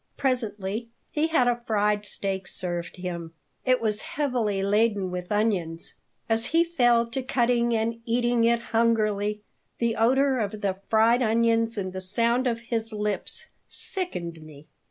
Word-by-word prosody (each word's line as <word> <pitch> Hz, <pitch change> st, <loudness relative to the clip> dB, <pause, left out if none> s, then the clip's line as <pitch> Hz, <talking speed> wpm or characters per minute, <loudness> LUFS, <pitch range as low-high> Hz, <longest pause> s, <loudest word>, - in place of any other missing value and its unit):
Presently 225 Hz, -4 st, -1 dB, 0.2 s
he 305 Hz, +1 st, +1 dB
had 315 Hz, -7 st, +3 dB
a 240 Hz, 0 st, +1 dB
fried 210 Hz, -1 st, +1 dB
steak 190 Hz, -3 st, -3 dB
served 175 Hz, -2 st, -4 dB
him. 170 Hz, -2 st, -5 dB, 0.3 s
It 255 Hz, 0 st, +4 dB
was 215 Hz, -2 st, 0 dB
heavily 240 Hz, -9 st, -1 dB
laden 205 Hz, -2 st, +2 dB
with 180 Hz, +1 st, -5 dB
onions. 190 Hz, -6 st, 0 dB, 0.3 s
As 225 Hz, 0 st, +1 dB
he 330 Hz, +2 st, +4 dB
fell 240 Hz, -8 st, +3 dB
to 265 Hz, -, -2 dB
cutting 240 Hz, -2 st, +1 dB
and 225 Hz, +1 st, -1 dB
eating 240 Hz, 0 st, +1 dB
it 235 Hz, 0 st, +3 dB
hungrily 215 Hz, -2 st, +1 dB, 0.3 s
the 235 Hz, -1 st, 0 dB
odor 260 Hz, +3 st, +3 dB
of 210 Hz, -1 st, -3 dB
the 195 Hz, -1 st, -1 dB
fried 230 Hz, +3 st, +4 dB
onions 230 Hz, 0 st, +2 dB
and 185 Hz, -2 st, -3 dB
the 185 Hz, -, -4 dB
sound 235 Hz, +6 st, +1 dB
of 230 Hz, -1 st, -1 dB
his 225 Hz, -1 st, -3 dB
lips 210 Hz, -1 st, -2 dB, 0.2 s
sickened 175 Hz, -, -4 dB
me. 155 Hz, -1 st, -13 dB
225 Hz, 150 wpm, -26 LUFS, 200-240 Hz, 0.3 s, It